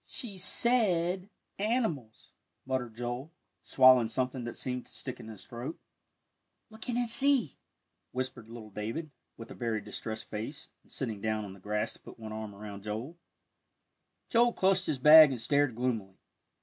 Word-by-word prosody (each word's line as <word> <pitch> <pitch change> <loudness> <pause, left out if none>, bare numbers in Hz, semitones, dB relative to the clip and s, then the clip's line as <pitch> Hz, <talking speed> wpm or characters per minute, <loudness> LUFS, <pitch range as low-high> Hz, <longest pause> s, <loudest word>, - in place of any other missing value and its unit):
"She 205 -7 -6
said 185 -4 +2 0.3
animals," 200 - -2 0.3
muttered 125 -4 -2
Joel, 120 +5 -4 0.3
swallowing 130 -3 +6
something 125 +1 -2
that 120 - -6
seemed 125 -1 -4
to - - -17
stick 130 - -7
in - - -10
his 110 -3 -10
throat. 125 +7 -6 0.9
"Look 220 +3 -9
in 240 - 0
and 245 -1 +1
see," 260 - +2 0.5
whispered 125 -3 -4
little 115 -2 -10
David, 115 +10 -4 0.3
with 115 0 -10
a - - -6
very 115 -3 -2
distressed 110 +1 -5
face, 115 +8 -6
and - - -23
sitting 110 -7 -4
down 110 -1 -1
on 95 - -8
the 95 - -14
grass 105 +3 -2
to - - -19
put - - -13
one 110 -1 -7
arm 110 -2 -6
around 100 -1 -8
Joel. 110 +10 -5 1.1
Joel 240 0 +4
clutched 190 -1 +2
his 140 - 0
bag 150 +3 +10
and 130 -3 -3
stared 140 +1 +2
gloomily. 115 -6 -2
125 Hz, 160 wpm, -31 LUFS, 110-165 Hz, 1.1 s, bag